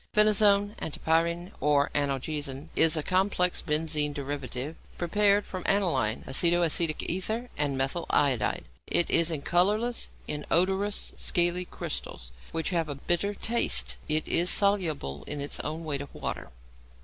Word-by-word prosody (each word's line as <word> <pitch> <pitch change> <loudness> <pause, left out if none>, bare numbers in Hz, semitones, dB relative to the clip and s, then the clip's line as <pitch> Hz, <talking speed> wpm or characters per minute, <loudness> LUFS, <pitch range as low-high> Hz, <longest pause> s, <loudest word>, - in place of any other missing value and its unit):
=Phenazone, 205 -1 +5
Antipyrine, 170 +3 -1
or 145 0 +2
Analgesin=, 145 +1 -2
is 165 0 +5
a 155 - -1
complex 185 0 +1
benzene 150 -2 0
derivative 140 0 -5 0.2
prepared 200 +3 +2
from 185 - -6
aniline, 135 - +1
aceto 175 +4 +2
acetic 160 -1 0
ether, 220 +7 -2
and 145 -2 -1
methyl 135 +6 -1
iodide. 130 -7 +1 0.2
It 170 - +1
is 165 0 +4
in 155 -4 -3
colourless, 210 +9 +1 0.2
inodorous, 190 +7 0
scaly 175 0 +2
crystals, - - -6 0.2
which 165 +3 -2
have 165 -3 -1
a 145 - -3
bitter 175 +8 -1
taste. 65 - +1
It 155 +1 +1
is 175 +2 +2
soluble 165 - +2
in 145 - -4
its 140 +1 -2
own 160 +2 -4
weight 140 -3 -2
of 140 - -9
water. - - -5
165 Hz, 135 wpm, -27 LUFS, 145-185 Hz, 0.2 s, =Phenazone